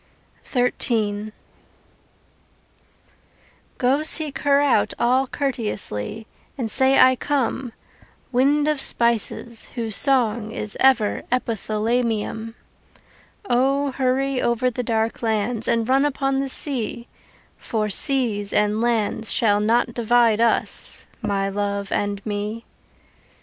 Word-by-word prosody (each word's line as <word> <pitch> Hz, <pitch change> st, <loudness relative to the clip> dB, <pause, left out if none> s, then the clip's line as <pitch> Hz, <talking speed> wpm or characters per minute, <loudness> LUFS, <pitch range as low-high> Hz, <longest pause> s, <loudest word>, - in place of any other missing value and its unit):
XIII 215 Hz, -4 st, -1 dB, 2.5 s
Go 260 Hz, +4 st, +1 dB
seek 310 Hz, -2 st, 0 dB
her 280 Hz, -1 st, +3 dB
out 285 Hz, -2 st, +2 dB
all 255 Hz, +3 st, +2 dB
courteously, 220 Hz, -, -4 dB, 0.3 s
And 230 Hz, -5 st, -2 dB
say 265 Hz, 0 st, +4 dB
I 260 Hz, 0 st, +6 dB
come, 265 Hz, -2 st, -2 dB, 0.6 s
Wind 285 Hz, +4 st, +2 dB
of 300 Hz, -3 st, 0 dB
spices 235 Hz, -1 st, -1 dB
whose 225 Hz, -4 st, 0 dB
song 235 Hz, -6 st, +4 dB
is 215 Hz, -3 st, -4 dB
ever 250 Hz, -6 st, +3 dB
Epithalamium. 225 Hz, -1 st, -2 dB, 0.9 s
O, 275 Hz, +3 st, +1 dB
hurry 265 Hz, 0 st, 0 dB
over 240 Hz, +2 st, 0 dB
the 250 Hz, -, -3 dB
dark 225 Hz, -1 st, -2 dB
lands 220 Hz, 0 st, -1 dB
And 230 Hz, -1 st, +1 dB
run 265 Hz, +2 st, +3 dB
upon 270 Hz, -1 st, 0 dB
the 275 Hz, 0 st, -2 dB
sea 245 Hz, -4 st, -2 dB, 0.5 s
For 215 Hz, -2 st, -2 dB
seas 225 Hz, -5 st, +2 dB
and 210 Hz, +1 st, +1 dB
lands 225 Hz, -1 st, 0 dB
shall 205 Hz, -3 st, +2 dB
not 230 Hz, +3 st, +1 dB
divide 235 Hz, -1 st, +2 dB
us 235 Hz, -, 0 dB, 0.2 s
My 200 Hz, -2 st, -1 dB
love 200 Hz, 0 st, -3 dB
and 205 Hz, -1 st, -2 dB
me. 210 Hz, +2 st, -4 dB
235 Hz, 110 wpm, -22 LUFS, 215-265 Hz, 2.5 s, I